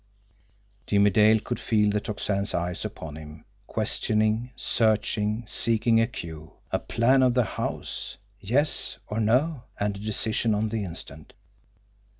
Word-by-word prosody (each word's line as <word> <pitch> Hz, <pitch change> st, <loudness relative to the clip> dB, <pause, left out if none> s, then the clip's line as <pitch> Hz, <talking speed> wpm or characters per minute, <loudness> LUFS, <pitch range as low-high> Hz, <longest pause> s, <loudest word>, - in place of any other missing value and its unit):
Jimmie 100 Hz, 0 st, +4 dB
Dale 110 Hz, +2 st, +5 dB
could 120 Hz, +3 st, -4 dB
feel 105 Hz, -2 st, +2 dB
the 105 Hz, -, +1 dB
Tocsin's 100 Hz, -1 st, -2 dB
eyes 85 Hz, 0 st, -2 dB
upon 75 Hz, -1 st, -6 dB
him, 75 Hz, 0 st, -11 dB, 0.2 s
questioning, 110 Hz, +2 st, 0 dB
searching, 110 Hz, 0 st, +1 dB
seeking 115 Hz, +1 st, +2 dB
a 115 Hz, -, +2 dB
cue. 80 Hz, -8 st, -8 dB, 0.2 s
A -, -, +1 dB
plan 130 Hz, +3 st, +3 dB
of 125 Hz, -1 st, +4 dB
the 125 Hz, -, +4 dB
house 105 Hz, -, -4 dB, 0.2 s
yes 130 Hz, +10 st, 0 dB
or 105 Hz, -, -3 dB
no? 125 Hz, +5 st, +2 dB
And 100 Hz, 0 st, 0 dB
a -, -, -8 dB
decision 110 Hz, +1 st, 0 dB
on 110 Hz, +1 st, 0 dB
the 110 Hz, -1 st, -2 dB
instant! 80 Hz, -4 st, -8 dB
105 Hz, 140 wpm, -26 LUFS, 100-115 Hz, 0.2 s, Dale